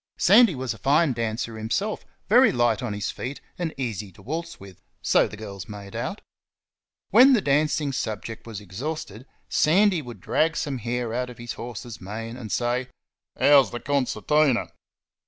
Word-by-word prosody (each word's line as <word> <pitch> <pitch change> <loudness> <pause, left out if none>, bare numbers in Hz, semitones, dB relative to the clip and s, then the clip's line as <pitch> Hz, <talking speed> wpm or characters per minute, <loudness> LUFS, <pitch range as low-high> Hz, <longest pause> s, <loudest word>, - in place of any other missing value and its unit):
Sandy 210 -1 +6
was 130 -2 -3
a 110 - -14
fine 145 +5 +3
dancer 115 -1 -3
himself, 195 - -2 0.2
very 240 +2 +6
light 120 -2 +1
on 125 -3 -3
his 105 0 -3
feet 130 +3 -6 0.2
and 170 -2 -1
easy 110 -7 -4
to - - -17
waltz 165 +5 -5
with 95 -2 -13 0.2
so - - +3
the 105 - -10
girls 100 -2 -8
made 100 -1 -9
out. - - -4 0.9
When 255 +6 +8
the 240 - +5
dancing 150 -1 +1
subject 115 -3 -5
was 110 -3 -6
exhausted 110 - -6 0.2
Sandy 185 +2 +3
would 120 -6 -10
drag 165 - +1
some 135 -3 -2
hair 120 0 -3
out 125 +1 -2
of 125 - -11
his 120 0 -6
horse's 120 -1 -8
mane 115 +4 -6
and 115 -5 -8
say, 125 +1 0 0.5
"How's 140 -2 +6
the 120 - -5
concertina?" 140 0 +1
125 Hz, 165 wpm, -25 LUFS, 110-150 Hz, 0.9 s, When